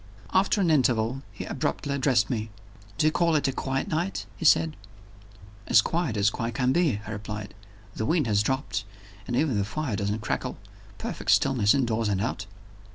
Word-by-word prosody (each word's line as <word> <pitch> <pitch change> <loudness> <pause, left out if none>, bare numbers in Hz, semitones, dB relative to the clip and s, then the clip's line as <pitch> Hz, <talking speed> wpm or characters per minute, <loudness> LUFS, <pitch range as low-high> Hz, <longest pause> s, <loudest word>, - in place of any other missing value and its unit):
After 195 +2 +3
an 175 -4 +3
interval, 125 -3 +2
he - - -7
abruptly 140 - -2
addressed 130 -5 +2
me. 110 -3 -3 0.5
"Do 150 - +2
you 155 - +5
call 170 0 +2
it 145 -2 +2
a - - +1
quiet 135 0 -2
night?" 170 +5 -2
he 165 - -6
said. 160 +1 +4 0.9
"As - - +6
quiet 165 -10 -1
as 100 +1 +3
quiet 115 +1 -3
can 125 0 +2
be," 155 - +2
I 105 - -6
replied. 105 -1 -6 0.4
"The 110 - -3
wind 165 -4 +2
has 105 -3 +2
dropped 130 -2 -1 0.4
and 120 - -2
even 130 -5 +1
the - - +1
fire 130 +2 -3
doesn't 105 +1 -2
crackle. - - -2 0.4
Perfect - - -5
stillness 110 -5 +4
indoors 115 -5 0
and 100 -2 0
out." 105 -1 -3
125 Hz, 180 wpm, -26 LUFS, 105-150 Hz, 0.9 s, As